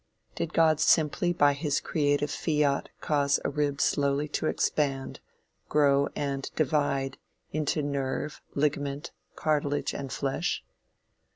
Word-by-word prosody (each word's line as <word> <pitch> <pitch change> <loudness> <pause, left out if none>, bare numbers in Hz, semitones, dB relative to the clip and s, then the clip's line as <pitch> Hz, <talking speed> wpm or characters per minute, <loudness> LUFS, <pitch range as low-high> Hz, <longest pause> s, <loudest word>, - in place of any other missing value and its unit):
Did 170 - -3
God 160 -2 +4
simply 160 +3 +3
by 145 -5 +4
his 145 0 0
creative 145 -1 0
fiat 150 -3 0
cause 140 -2 +2
a - - 0
rib 145 -1 -1
slowly 140 0 +1
to 155 - -1
expand, 135 -4 -1 0.5
grow 140 -1 +4
and 140 -1 -2
divide 140 -3 0 0.3
into 155 0 0
nerve, 140 +1 -3
ligament, 145 -1 -1 0.2
cartilage 145 -2 0
and 135 -2 -5
flesh? 135 -1 -1
145 Hz, 115 wpm, -28 LUFS, 140-150 Hz, 0.5 s, God